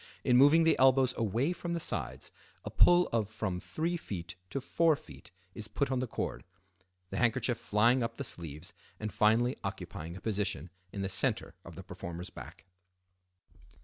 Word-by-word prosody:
In 125 - +3
moving 145 +6 +7
the 160 -1 +3
elbows 130 -1 +5
away 115 - 0
from 175 -1 -4
the 170 - -1
sides 65 - -3 0.3
a - - -5
pull 175 0 +5
of 110 -3 0
from 105 -4 -3
3ft. 105 - -4 0.2
to 140 - -2
4ft. 155 +3 0 0.2
is 110 -1 -7
put 140 -2 -1
on 130 - +1
the 130 - -2
cord, - - -4 0.7
the - - -3
handkerchief 120 0 +1
flying 115 +5 +3
up 115 - -2
the 140 - -4
sleeves 85 - -5 0.3
and 110 0 -4
finally 115 +4 +3
occupying 80 +3 -6
a - - -8
position 95 -6 -2 0.2
in 100 - -4
the - - -1
center 95 - +1
of - - -11
the - - -9
performer's 85 +1 -7
back. - - -11
115 Hz, 165 wpm, -31 LUFS, 95-135 Hz, 0.7 s, moving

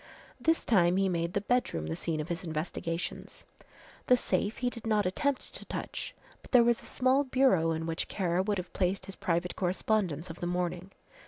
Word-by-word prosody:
This 325 0 +2
time 180 -5 +4
he 195 0 +3
made 170 -1 -1
the 200 - 0
bedroom 205 - 0
the 80 +1 -3
scene 160 -2 -2
of 155 - -4
his 175 +1 -3
investigations. 165 +1 -4 0.6
The 250 - +6
safe 215 -2 0
he 245 0 0
did 230 -1 -6
not 210 -2 +2
attempt 275 +9 -1
to - - -5
touch, - - -5 0.3
but - - -16
there 245 -2 +7
was 235 0 +2
a - - -13
small 260 +2 +3
bureau 255 - +3
in 160 0 -1
which 165 0 -2
Kara 180 -2 0
would 205 +1 0
have 180 -1 -6
placed 185 0 0
his 195 -1 -8
private 170 +1 -1
correspondence 180 -3 0
of 165 - -11
the 175 - -2
morning. 180 +1 -2
185 Hz, 195 wpm, -30 LUFS, 170-225 Hz, 0.6 s, there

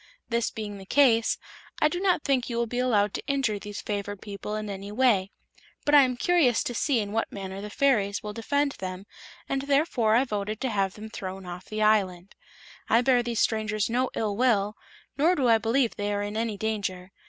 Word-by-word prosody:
This 235 -1 0
being 205 -2 -6
the 190 - -11
case, 235 -5 +4 0.4
I - - +5
do 350 +3 -3
not 370 -5 +2
think 260 -3 +1
you 235 - -3
will 235 - +1
be 245 +2 -3
allowed 210 -5 +2
to - - -4
injure 270 -7 0
these 205 0 -7
favored 205 -1 -4
people 205 +1 -6
in 215 0 -4
any 200 0 -6
way; 210 -5 +2 0.6
but 290 - +1
I 290 - +9
am 255 -2 +1
curious 295 -7 +3
to 245 - -3
see 255 +1 +1
in 205 -2 -3
what 225 +1 -1
manner 195 -1 -6
the 210 - -6
fairies 210 -5 +1
will 210 0 -5
defend 285 +6 0
them, 185 +1 -5 0.4
and 270 0 -1
therefore 275 -6 +2
I 245 - +4
voted 210 -3 -3
to 260 - -1
have 195 -2 0
them 215 +1 -9
thrown 190 -1 -6
off 180 0 -8
the 215 0 -2
island. 195 -4 +1 0.6
I 230 - +5
bear 250 -1 +3
these 235 -2 -1
strangers 215 -1 0
no 250 +2 +1
ill 210 -2 -1
will, 215 -3 +2 0.4
nor 335 +5 +4
do 265 -6 +1
I 225 -1 +5
believe 235 +2 +1
they 205 0 -2
are 205 0 -1
in 205 +1 -5
any 220 -2 -1
danger. 195 -4 -3
220 Hz, 210 wpm, -27 LUFS, 205-250 Hz, 0.6 s, I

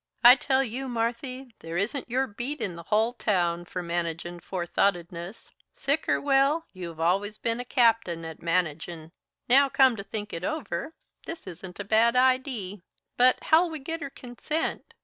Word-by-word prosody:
I 245 +1 +11
tell 265 +1 +1
you, 265 +2 -4
Marthy, 245 +2 -3
there 165 +1 -5
isn't 240 +8 -2
your 260 +3 +1
beat 255 +6 -5
in 195 -6 -3
the 170 - -8
hull 220 +3 +3
town 175 -7 0
for 180 +1 -5
managin' 170 0 -3
forethoughtedness. 175 +1 -2 0.2
Sick 280 +3 -1
or - - +3
well, 280 +3 +2
you've 170 -4 -8
allus 195 +6 +1
ben 230 +1 -2
a 245 - -4
captain 225 - +2
at 160 -1 -8
managin'. 165 -1 -2 0.4
Now, 275 +3 +6
come 265 -3 +5
to 200 - -5
think 205 +1 -6
it 165 - -5
over, 285 - -3 0.3
this 330 0 -7
isn't 180 0 -9
a - - -2
bad 225 +4 +3
idee. 255 -7 +1 0.3
But, 250 +1 +4
how'll 335 +2 +4
we 320 - -5
git 325 +4 -5
her 280 - -4
consent? 275 +5 -4
225 Hz, 170 wpm, -27 LUFS, 175-265 Hz, 0.4 s, I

